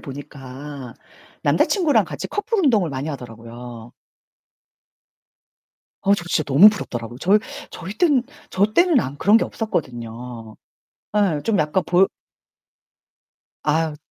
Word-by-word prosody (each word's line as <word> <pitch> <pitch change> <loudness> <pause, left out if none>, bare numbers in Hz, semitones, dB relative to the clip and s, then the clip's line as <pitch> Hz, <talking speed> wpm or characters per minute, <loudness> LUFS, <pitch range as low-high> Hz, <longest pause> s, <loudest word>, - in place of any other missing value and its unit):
보니까 135 -1 -9 0.5
남자친구랑 345 -8 +3
같이 - - -6
커플 415 +2 -2
운동을 225 - +3
많이 135 +2 -4
하더라고요. 120 -2 -9 2.1
어 200 - +3
저 175 - -7
진짜 165 -2 +1
너무 150 +10 +7
부럽더라고요. 120 - -6
저희 200 +5 +4 0.3
저희 185 +3 -7
때는 290 -8 +3 0.3
저 195 +2 +2
때는 345 -3 +4
아무 140 - -4
그런 210 +3 +5
게 - - 0
없었거든요. 120 - -5 0.6
예 190 -8 +2
좀 220 -3 +1
약간 155 +4 +1
볼 180 +2 +4 1.6
아유. 155 0 0
150 Hz, 255 characters per minute, -21 LUFS, 125-205 Hz, 2.1 s, 너무